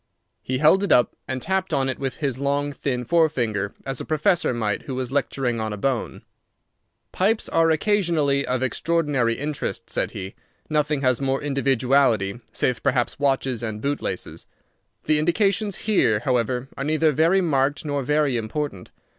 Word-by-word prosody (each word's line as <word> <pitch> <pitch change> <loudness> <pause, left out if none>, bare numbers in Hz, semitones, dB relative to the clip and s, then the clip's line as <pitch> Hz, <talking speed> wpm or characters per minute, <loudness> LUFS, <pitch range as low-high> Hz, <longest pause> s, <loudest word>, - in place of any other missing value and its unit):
He 130 - -2
held 155 +8 +4
it 200 - -1
up 120 - +4
and 130 0 -3
tapped 190 0 0
on 135 -1 +1
it 130 - -2
with 135 -1 -3
his 135 -5 -2
long, 140 +1 0
thin 125 -3 -3
fore 165 +4 +3
finger, 110 -8 -2
as 135 0 -3
a - - -4
professor 165 +2 +1
might 110 -4 -1
who 135 - -3
was 130 -1 -3
lecturing 135 -3 -1
on 110 -1 -2
a 105 - -4
bone. 130 +3 -2 0.9
"Pipes 215 +4 +1
are 165 0 +3
occasionally 160 -6 +2
of 130 -1 -1
extraordinary 140 -4 0
interest," 145 0 -4
said - - -1
he. 95 +1 -7 0.4
"Nothing 150 -1 +1
has 130 -1 +1
more 135 0 0
individuality, 130 -6 +2
save 125 -2 -1
perhaps 125 0 0
watches 135 -3 0
and 110 -2 -4
bootlaces. 140 -8 -3 0.6
The 155 0 +2
indications 200 +4 +1
here, 115 - +2
however, 125 0 0
are 135 - -4
neither 155 +1 +2
very 165 +6 +3
marked 145 -2 0
nor 145 -1 -1
very 145 -1 +1
important. 115 -3 -4
140 Hz, 165 wpm, -23 LUFS, 125-155 Hz, 0.9 s, held